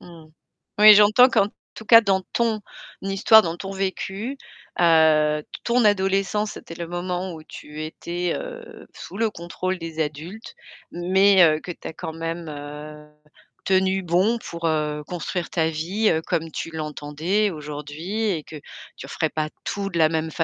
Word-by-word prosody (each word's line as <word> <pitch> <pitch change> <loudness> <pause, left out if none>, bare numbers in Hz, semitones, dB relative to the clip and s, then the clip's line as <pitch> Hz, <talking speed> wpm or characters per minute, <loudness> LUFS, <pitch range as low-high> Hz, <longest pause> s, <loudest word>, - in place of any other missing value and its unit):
Mmh, 170 -3 -14 0.5
oui, 215 0 +10
j'entends 210 +5 +6
qu'en 200 - +3 0.3
tout 220 - -10
cas, 230 +1 +8
dans 195 -3 +1
ton 225 -2 0 0.4
histoire, 195 +3 +5
dans 165 -2 -3
ton 195 +2 -7
vécu, 195 +5 -4 0.4
heu, 155 -2 +4 0.2
ton 240 0 +2
adolescence, 200 +1 +1
c'était 165 - -10
le 170 0 -6
moment 180 +1 -3
où 160 - -10
tu 150 0 -9
étais, 175 +3 -4
heu, 485 -2 -9
sous - - -10
le 225 0 +1
contrôle 185 +1 -4
des 165 -1 -6
adultes 155 +9 -7 0.4
mais 190 +2 +4
heu, 155 -1 +3
que - - -9
tu - - -13
as - - -7
quand 160 - -7
même 165 +1 -5
heu, 150 +1 -9 0.6
tenu 190 0 +2
bon 185 +7 +2
pour 170 -7 -5
heu, 150 -1 -1
construire 175 0 -4
ta 160 -2 0
vie, 180 +8 0
heu, 160 - +1
comme 165 -1 -2
tu 165 - -5
l'entendais 160 +6 -1
aujourd'hui 155 +7 -5
et 160 -6 -3
que 155 - -10 0.4
tu - - -9
referais - - -2
pas 155 -1 -2 0.2
tout 200 -1 -3
de 170 - -3
la 160 -1 +5
même 160 0 -2
175 Hz, 165 wpm, -23 LUFS, 160-200 Hz, 0.6 s, oui